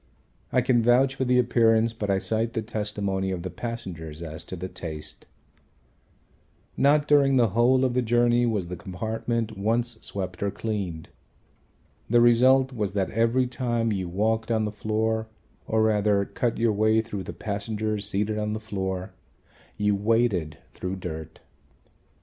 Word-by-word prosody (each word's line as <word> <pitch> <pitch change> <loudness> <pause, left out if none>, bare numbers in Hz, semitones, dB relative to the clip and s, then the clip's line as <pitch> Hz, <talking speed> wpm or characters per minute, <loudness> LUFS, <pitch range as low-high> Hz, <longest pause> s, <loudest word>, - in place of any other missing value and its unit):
I 125 - +3
can 120 -1 +3
vouch 125 +3 +4
for 135 -1 -2
the 125 0 +3
appearance, 115 -2 +3
but 105 -3 -4
I 100 - +3
cite 115 +3 -1
the 110 - -2
testimony 105 -3 -2
of 90 -2 -3
the 95 - -5
passengers 85 -7 -6
as 80 -1 -5
to - - -6
the 90 +1 -5
taste. 80 -4 -7 1.5
Not 145 +1 +3
during 140 -2 +4
the 120 -3 +4
whole 125 +5 +3
of 125 - 0
the 125 - +2
journey 120 +1 +3
was 105 -6 -1
the 90 +1 -6
compartment 110 +5 -3
once 115 +2 0
swept 95 -3 -4
or 100 - +1
cleaned. 100 -7 -4 1.0
The 120 +2 +5
result 130 +3 +5
was 105 -5 -2
that 95 -2 -1
every 115 +4 +2
time 120 -2 -1
you 95 -4 -2
walked 110 +5 0
on 110 -2 +1
the 105 - -3
floor 110 +1 -1 0.4
or 110 0 +2
rather 105 -2 +2
cut 120 +2 -2
your 115 -1 +2
way 110 +2 +3
through 105 -3 -5
the 90 - -6
passengers 105 +2 -2
seated 105 +1 -1
on 105 0 -2
the 110 - -3
floor, 95 -3 -4 0.6
you 105 0 +2
waded 105 -6 +1 0.2
through 90 +1 -4
dirt. 80 -4 -7
110 Hz, 160 wpm, -26 LUFS, 95-120 Hz, 1.5 s, The